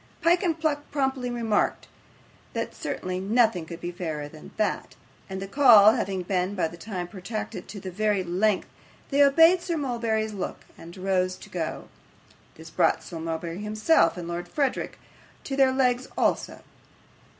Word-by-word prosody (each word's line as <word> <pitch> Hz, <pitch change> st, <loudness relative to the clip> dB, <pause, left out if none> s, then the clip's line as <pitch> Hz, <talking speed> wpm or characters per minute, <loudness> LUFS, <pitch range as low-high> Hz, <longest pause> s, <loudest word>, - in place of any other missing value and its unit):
Pyke 345 Hz, +1 st, +4 dB
and 330 Hz, -4 st, 0 dB
Pluck 295 Hz, -2 st, -1 dB
promptly 265 Hz, -3 st, -1 dB
remarked 230 Hz, -3 st, 0 dB, 0.7 s
that -, -, -3 dB
certainly 185 Hz, 0 st, -4 dB
nothing 215 Hz, -3 st, +2 dB
could 170 Hz, 0 st, -8 dB
be 175 Hz, 0 st, -4 dB
fairer 160 Hz, -4 st, -4 dB
than 155 Hz, +1 st, -12 dB
that; 215 Hz, -, -1 dB, 0.3 s
and 190 Hz, 0 st, -4 dB
the 195 Hz, -, -5 dB
call 220 Hz, -4 st, +7 dB
having 190 Hz, -4 st, -2 dB
been 185 Hz, +1 st, -1 dB
by 180 Hz, -4 st, +1 dB
this 170 Hz, +1 st, -12 dB
time 185 Hz, -5 st, -4 dB
protracted 205 Hz, +4 st, -6 dB
to 200 Hz, -3 st, -8 dB
a -, -, -4 dB
very 205 Hz, 0 st, +1 dB
great 175 Hz, -1 st, -6 dB
length, 205 Hz, +1 st, +2 dB, 0.4 s
they 280 Hz, +1 st, +3 dB
obeyed 325 Hz, +6 st, +6 dB
Sir 340 Hz, -2 st, -2 dB
Mulberry's 230 Hz, -5 st, -1 dB
look, 195 Hz, -, -5 dB
and 170 Hz, +3 st, -12 dB
rose 185 Hz, -1 st, 0 dB
to -, -, -14 dB
go. 165 Hz, -3 st, -4 dB, 0.7 s
This 160 Hz, 0 st, -12 dB
brought -, -, +2 dB
Sir 165 Hz, -, -7 dB
Mulberry 165 Hz, +2 st, -4 dB
himself 215 Hz, -, +2 dB
and 175 Hz, -1 st, -6 dB
Lord 175 Hz, +1 st, -4 dB
Verisopht 275 Hz, +7 st, -1 dB, 0.5 s
on 270 Hz, -, -1 dB
their 265 Hz, -1 st, +5 dB
legs 255 Hz, -1 st, +1 dB
also. -, -, 0 dB
205 Hz, 165 wpm, -26 LUFS, 180-255 Hz, 0.7 s, call